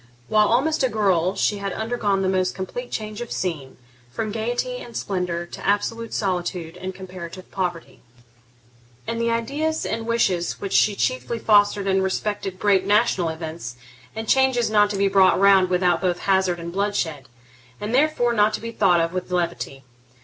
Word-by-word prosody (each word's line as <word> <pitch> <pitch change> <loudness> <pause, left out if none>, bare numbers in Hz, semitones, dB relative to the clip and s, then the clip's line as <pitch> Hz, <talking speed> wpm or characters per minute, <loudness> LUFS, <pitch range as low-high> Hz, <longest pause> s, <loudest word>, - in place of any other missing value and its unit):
While 210 -1 +4
almost 280 +8 +2
a 260 - +3
girl 190 -4 +1
she 205 - 0
had 200 -1 -3
undergone 220 -4 -1
the - - +1
most 185 -1 0
complete 245 +6 -5
change 215 +1 -5
of 240 - -6
scene, 155 -8 -4 0.3
from 215 - -3
gaiety 240 - -2
and 240 - -8
splendour 180 -3 -2
to - - -10
absolute 225 +3 -1
solitude 180 -4 -2
and 185 +1 -6
comparative 185 -1 -9
poverty; 175 -3 -4 1.0
and 230 0 -3
the 235 - +1
ideas 285 +8 -1
and 225 +1 -3
wishes 190 -7 +1
which 200 - -4
she 210 - +4
chiefly 255 +1 -1
fostered 205 -2 +3
respected 195 0 -1
great 195 -1 +3
national 205 -5 +2
events, 160 -6 -6 0.4
and 220 0 -5
changes 260 -3 +3
not 210 -1 +4
to 205 - -3
be 200 0 +3
brought 190 -1 +4
round 195 -2 +5
without 180 -1 +2
both 180 -2 0
hazard 190 -3 +1
and 170 0 -6
bloodshed, 190 - -2 0.5
and 210 +3 -4
therefore 260 -3 +2
not 210 -1 +3
to - - -6
be 230 0 -6
thought 185 -6 +3
of 165 +1 0
with 185 0 -4
levity. 135 -6 -2
200 Hz, 170 wpm, -23 LUFS, 180-225 Hz, 1.0 s, round